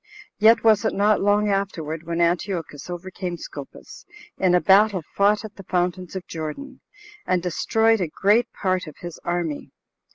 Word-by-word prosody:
Yet 225 +2 +5
was 215 -3 +4
it 220 - 0
not 205 +1 +3
long 205 +1 +2
afterward 170 -5 -2
when 170 0 -1
Antiochus 170 -3 -1
overcame 180 0 -5
Scopas, 145 -3 -10 0.4
in 180 -2 +3
a - - +5
battle 195 -1 +4
fought 205 +2 +3
at 215 0 -11
the 195 - -10
fountains 180 0 -1
of 185 -2 -5
Jordan, 180 - -7 0.5
and 180 -1 +1
destroyed 220 +5 +2
a 175 - 0
great 205 +9 +2
part 185 -2 -1
of 155 - -10
his 175 -1 -8
army. 170 -4 -3
185 Hz, 160 wpm, -23 LUFS, 170-205 Hz, 0.5 s, Yet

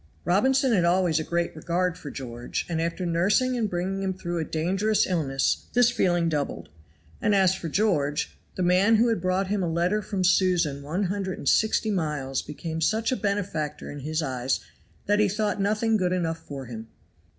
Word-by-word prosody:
Robinson 260 +8 +3
had 185 -5 +3
always 170 -2 +2
a - - -2
great 170 +1 -2
regard 175 +2 -1
for 150 - -8
George, 120 -3 -5
and 165 -2 -1
after 170 +2 -2
nursing 200 +10 +2
and 225 -4 0
bringing 185 +2 -2
him 190 -1 -1
through 175 -2 -3
a - - 0
dangerous 190 +7 +1
illness 140 -7 0
this 245 -1 +5
feeling 175 -7 +1
doubled. 145 - -2 0.5
And 210 - +3
as 190 -2 +4
for 175 -3 -5
George, 155 -6 0 0.2
the 185 - -1
man 185 +5 +4
who 235 +2 +4
had 225 -6 0
brought 185 +2 +1
him 205 -1 0
a 175 - 0
letter 175 +6 +1
from 195 -2 -3
Susan 180 -6 +2
one 160 +8 -2
hundred 190 0 -2
and - - -7
sixty 220 +3 +3
miles 150 -7 -1
became 160 +2 -6
such 220 +7 +1
a - - +2
benefactor 200 -9 -2
in 145 - -7
his 155 +3 -2
eyes 130 -2 -1 0.5
that 205 +1 +2
he 210 -1 +4
thought 205 0 -1
nothing 215 +2 +2
good 180 -2 0
enough 165 -2 -1
for 140 -4 -8
him. 115 -2 -8
180 Hz, 190 wpm, -26 LUFS, 160-205 Hz, 0.5 s, this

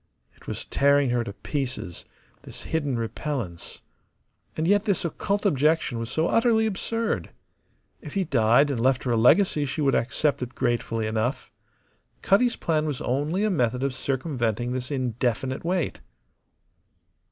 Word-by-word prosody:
It - - -21
was - - -5
tearing 140 -2 +3
her 120 -1 +1
to 100 - -6
pieces, 130 - -4 0.4
this - - -11
hidden 145 -6 -1
repellence. 115 - -5 0.7
And 160 +1 0
yet 205 +2 +3
this 200 -5 0
occult 200 +5 -2
objection 150 - +2
was 115 0 -4
so 160 +5 0
utterly 230 -1 +3
absurd. 225 +2 -2 0.7
If - - -9
he 195 - +2
died 135 -1 +3
and 130 - -2
left 130 +2 +2
her 125 - -1
a - - +3
legacy 150 - +4
she 135 - -4
would 135 -2 +2
accept 140 +5 +1
it 125 0 -5
gratefully 120 -3 -1
enough. 110 +4 -2 0.7
Cutty's 235 +5 +3
plan 155 -2 0
was 145 -4 -3
only 150 +10 0
a 215 - +2
method 125 -6 0
of 135 -1 0
circumventing 125 -4 -2
this 130 0 -3
indefinite 130 -1 -1
wait. 175 -2 -1
135 Hz, 150 wpm, -25 LUFS, 120-165 Hz, 0.7 s, legacy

